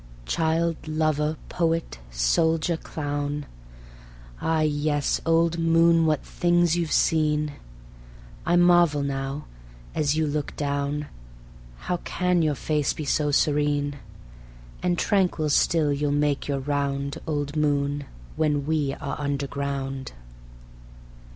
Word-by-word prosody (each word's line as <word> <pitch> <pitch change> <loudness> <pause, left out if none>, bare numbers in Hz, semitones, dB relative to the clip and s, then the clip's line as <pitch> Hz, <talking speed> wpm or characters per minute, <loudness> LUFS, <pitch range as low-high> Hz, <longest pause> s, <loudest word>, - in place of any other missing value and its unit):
Child, 165 - 0
lover, 155 0 0
poet, 165 - -1
soldier, 160 - +1
clown, 145 -2 -4 1.0
Ah 160 -1 +1
yes, 145 -1 0
old 165 0 +3
Moon, 165 0 +4
what 155 -2 +1
things 175 -1 +2
you've 170 -2 -1
seen! 150 -1 +2 0.9
I 175 - +2
marvel 175 -4 +5
now, 135 +1 -3 0.5
as 150 0 +1
you 160 - +2
look 150 -1 -3
down, 145 0 -2 0.8
How 180 - -1
can 180 0 0
your 155 -2 +1
face 150 +1 0
be 155 - -5
so 150 +1 +1
serene? 145 0 +1 0.8
And 175 -1 +1
tranquil 180 -6 +1
still 150 -1 +3
you'll 145 0 0
make 145 -1 0
your 140 -2 -1
round, 140 0 -2
Old 145 -1 -2
Moon, 145 -1 0 0.3
when 150 -2 +1
we 150 -3 0
are 140 +1 -5
underground. 140 - -3
150 Hz, 110 wpm, -25 LUFS, 145-160 Hz, 1.0 s, marvel